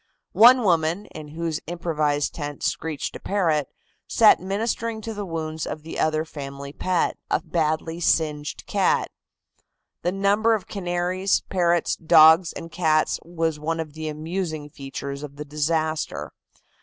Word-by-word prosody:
One 245 +2 +7
woman, 170 +1 +1
in 155 -1 -8
whose 160 +1 -3
improvised 155 -4 -1
tent 145 -2 -6
screeched 155 -4 -2
a - - -6
parrot, 160 -8 0 0.4
sat 225 -2 +6
ministering 220 +4 -2
to 225 +1 -5
the 205 -2 -5
wounds 160 -2 -4
of 150 0 -6
the 160 - -6
other 155 0 +1
family 140 -2 -8
pet, 180 +1 0
a - - +2
badly 160 0 -1
singed 150 -3 0
cat. - - +1 0.9
The 175 - 0
number 205 +4 +3
of 205 - -5
canaries, 180 0 0
parrots, 175 -2 +2
dogs 160 +1 +6
and 165 - -8
cats 155 -3 +1
was 165 -2 -2
one 165 +2 -2
of 155 -2 -5
the 160 0 -5
amusing 155 -1 -4
features 140 0 -6
of 145 -1 -8
the 150 +1 -7
disaster. 155 +1 -1
160 Hz, 145 wpm, -24 LUFS, 150-180 Hz, 0.9 s, One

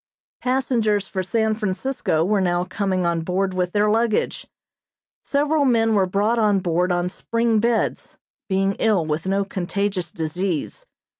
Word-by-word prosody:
Passengers 235 -6 +1
for 190 - -3
San 220 +3 0
Francisco 200 -4 -1
were 205 +1 +2
now 175 -1 +1
coming 185 -1 -1
on 170 -1 0
board 185 +3 -1
with 180 -1 -1
their 210 +2 +2
luggage. 225 0 0 0.8
Several 290 +1 +1
men 225 -4 +3
were 195 -3 +3
brought 210 +5 +1
on 210 -2 +3
board 180 0 0
on 175 0 0
spring 230 +4 0
beds, 230 +1 -1 0.3
being 195 +1 +1
ill 210 -7 +2
with 155 +3 -2
no 195 +1 +1
contagious 190 -1 -2
disease. 175 - -3
195 Hz, 145 wpm, -22 LUFS, 180-225 Hz, 0.8 s, men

